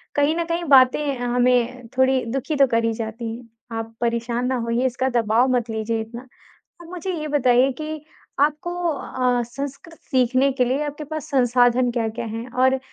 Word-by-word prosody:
कहीं 290 +2 +2
न 340 - 0
कहीं 340 +1 -2
बातें 265 +1 +4
हमें 245 0 +1
थोड़ी 260 0 +3
दुखी 270 +4 -2
तो 275 -1 +5
कर 230 -1 +1
ही 225 - +1
जाती 225 0 -5
हैं, 235 -1 -13 0.3
आप 225 0 -6
परेशान 235 +1 -1
ना 260 - 0
होइए, 235 +2 0
इसका 260 +1 0
दबाव 235 +1 +2
मत 235 -1 -1
लीजिए 225 0 -2
इतना। 235 +2 -8 0.6
आप - - -12
मुझे 365 +1 -4
ये 305 - -4
बताइए 260 -2 +3
कि 310 -1 -6 0.4
आपको 300 +4 +1 0.2
अ, 255 -4 0
संस्कृत 280 +7 -8
सीखने 255 +1 +3
के 255 -1 +1
लिए 270 +5 0
आपके 295 +1 -5
पास 310 -1 -5
संसाधन 245 -1 +3
क्या-क्या 230 0 -2
हैं? 225 +3 -6
और 260 +2 +2
250 Hz, 175 wpm, -22 LUFS, 235-275 Hz, 0.6 s, तो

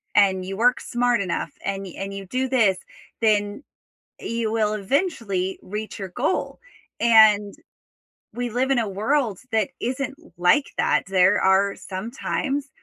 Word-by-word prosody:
and 190 -2 +4
you 195 +1 -5
work 245 +3 +3
smart 245 -2 0
enough 185 -3 -2 0.2
and 195 0 -2
y 185 - -9
and 195 0 -5
you 195 0 -7
do 255 +6 -1
this, 220 -8 +3 0.4
then 205 +2 +1 0.6
you 230 -1 -2
will 215 -1 +1
eventually 205 - -1
reach 210 +2 -6
your 190 - -5
goal, 250 - -2 0.4
and 215 -3 +5 0.8
we 245 0 -3
live 255 +4 0
in 265 - +3
a 220 - -1
world 220 +1 0
that 220 -3 +1
isn't 265 +3 -2 0.2
like 180 +12 +4
that, - - +2
there 185 -1 +4
are 195 +1 +3
some 190 +4 -6
times 275 +1 -2
215 Hz, 150 wpm, -23 LUFS, 195-245 Hz, 0.8 s, and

